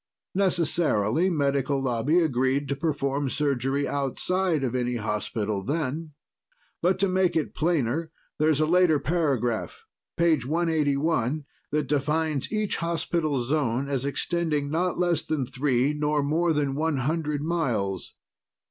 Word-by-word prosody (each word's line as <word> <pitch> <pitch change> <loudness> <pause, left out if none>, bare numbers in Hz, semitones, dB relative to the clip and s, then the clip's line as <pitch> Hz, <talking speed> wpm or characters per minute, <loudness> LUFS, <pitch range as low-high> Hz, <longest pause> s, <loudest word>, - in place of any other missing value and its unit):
Necessarily, 170 - +2
Medical 140 -4 +1
Lobby 135 +6 +2
agreed 135 -1 +1
to 140 - 0
perform 140 -2 -1
surgery 140 -1 0
outside 160 +4 0
of 125 -2 -1
any 125 -1 -1
hospital, 105 -2 -2
then. 150 +3 -3 0.7
But 180 +2 +2
to 200 - +4
make 185 -1 +1
it 160 - -1
plainer, 160 -1 0 0.3
there's 155 -1 +3
a 155 - +3
later 175 -1 +4
paragraph 140 -6 -1 0.3
page 165 -6 +3
181 150 -2 0 0.2
that 150 0 0
defines 150 0 0
each 215 -2 0
hospital 165 -5 -1
zone 135 -1 0
as 135 -2 -1
extending 145 +1 -1
not 175 +3 0
less 175 -3 +1
than 150 -5 -2
three 135 +1 +1
nor 150 0 0
more 165 +4 +1
than 145 -3 0
one 155 +1 0
hundred 150 +1 -1
miles. 120 - -1
150 Hz, 130 wpm, -26 LUFS, 135-165 Hz, 0.7 s, to